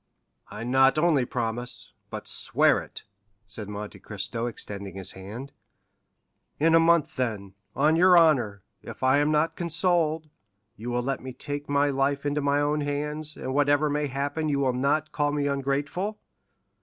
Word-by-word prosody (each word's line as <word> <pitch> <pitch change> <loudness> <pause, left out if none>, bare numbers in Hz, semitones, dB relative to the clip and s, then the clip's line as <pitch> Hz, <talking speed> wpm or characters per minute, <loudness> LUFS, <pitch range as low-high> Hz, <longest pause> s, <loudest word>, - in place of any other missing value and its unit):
"I - - -7
not 135 +3 +4
only 155 -5 +3
promise, 120 0 -3 0.2
but - - -7
swear - - +3
it!" - - -10 0.4
said 105 -1 -6
Monte 105 0 -7
Cristo 110 +3 -4
extending 100 -4 -6
his 95 -1 -2
hand. 110 +9 -8 1.1
"In 165 +2 +4
a 165 - +7
month, 165 -1 +3
then, 105 -6 -2 0.2
on 150 +3 +3
your 180 +1 +6
honor, 125 - +3 0.2
if - - -9
I 130 +2 +4
am 145 +1 +2
not 155 +2 +1
consoled, 165 -2 0 0.5
you 115 +2 -6
will 120 0 -1
let 135 +2 -2
me 130 0 -7
take 145 +2 -5
my 145 0 +2
life 140 +1 0
into 145 +1 0
my 140 0 +2
own 150 +1 +1
hands, 150 +1 -2
and 130 - -4
whatever 145 +1 +3
may 150 0 0
happen 145 +3 -2
you 140 - +1
will 135 -2 +1
not 140 +4 0
call 145 -1 0
me 145 -1 -1
ungrateful?" 145 +9 -1
140 Hz, 165 wpm, -26 LUFS, 125-150 Hz, 1.1 s, a